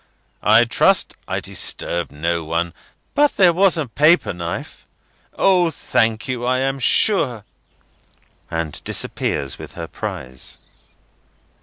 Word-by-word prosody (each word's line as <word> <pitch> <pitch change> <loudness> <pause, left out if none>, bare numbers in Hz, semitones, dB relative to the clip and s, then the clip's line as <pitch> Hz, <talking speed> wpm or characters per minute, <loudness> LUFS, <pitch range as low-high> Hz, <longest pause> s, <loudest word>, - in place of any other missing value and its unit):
I 110 +3 +5
trust 115 - +3
I - - -2
disturb 85 0 -1
no 85 +3 -2
one; 85 +2 -2 0.4
but 290 0 +2
there 180 -3 +5
was 185 0 +3
a 155 -4 -2
paper 150 - +3
knife—O, 165 - -2
thank 115 -6 0
you, 125 -2 -3
I 130 +1 +1
am 135 +1 -1
sure!" 130 - +3 1.1
and 80 -3 -4
disappears 70 -2 -1
with - - -10
her - - -6
prize. 65 0 -6
120 Hz, 115 wpm, -20 LUFS, -, 1.1 s, I